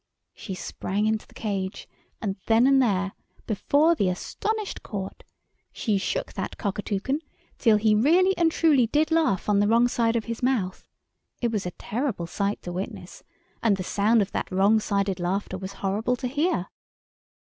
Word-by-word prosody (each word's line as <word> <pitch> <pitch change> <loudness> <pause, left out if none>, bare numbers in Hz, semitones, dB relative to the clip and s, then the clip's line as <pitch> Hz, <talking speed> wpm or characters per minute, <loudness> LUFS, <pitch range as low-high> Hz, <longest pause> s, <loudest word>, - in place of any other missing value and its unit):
She 190 - -7
sprang 195 +3 -2
into 220 0 0
the - - -21
cage, 200 -2 -3 0.3
and 195 -3 -2
then 230 +2 +5
and 270 0 +5
there, 195 -5 +1 0.3
before 285 - +3
the 200 - +1
astonished 425 - -3
Court, 195 -2 -6 0.5
she 210 -4 0
shook - - -2
that - - -5
Cockatoucan 205 +5 -2 0.4
till 225 -4 +5
he 215 0 +3
really 345 - +4
and 335 -2 +3
truly 295 -8 +4
did 300 +7 +1
laugh 315 - +2
on 205 -1 +3
the 205 - +3
wrong 230 +2 +4
side 230 -1 +1
of 225 - 0
his 230 -1 -5
mouth. 240 -8 -1 0.5
It 235 -2 0
was 205 -5 -2
a - - -3
terrible 230 -6 -2
sight 200 +4 -2
to 175 - -5
witness, 185 +3 -6 0.4
and 215 -4 +3
the 185 - -3
sound 210 +4 +3
of 195 - -8
that - - -3
wrong 200 +4 +4
sided 200 -3 -1
laughter 185 +1 -2
was 190 +1 -6
horrible 215 +6 +1
to 250 +1 -4
hear. 280 - 0
215 Hz, 170 wpm, -26 LUFS, 195-255 Hz, 0.5 s, then